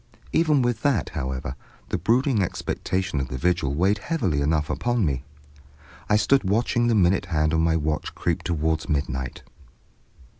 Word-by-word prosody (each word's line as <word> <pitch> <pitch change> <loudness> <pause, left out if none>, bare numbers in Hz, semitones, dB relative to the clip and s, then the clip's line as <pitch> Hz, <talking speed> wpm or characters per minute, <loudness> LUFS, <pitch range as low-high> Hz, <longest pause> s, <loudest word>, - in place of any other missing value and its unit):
Even 155 -5 +3
with 120 -2 0
that, 140 -2 +1
however, 65 -4 -4 0.3
the - - 0
brooding 115 - +2
expectation 95 -2 -2
of 65 - -2
the 65 - -5
vigil 70 -2 0
weighed 95 +6 +2
heavily 95 - -1
enough 75 +1 +1
upon 120 +1 0
me. 65 -4 -1 0.9
I 105 - +4
stood 135 +5 +3
watching 115 +4 +1
the 115 - +3
minute 95 -1 +3
hand 80 -3 +1
of 80 - +2
my 80 0 +2
watch 75 -1 -2
creep - - -1
towards 80 -1 -1
midnight. 65 -4 -2
85 Hz, 155 wpm, -24 LUFS, 75-110 Hz, 0.9 s, I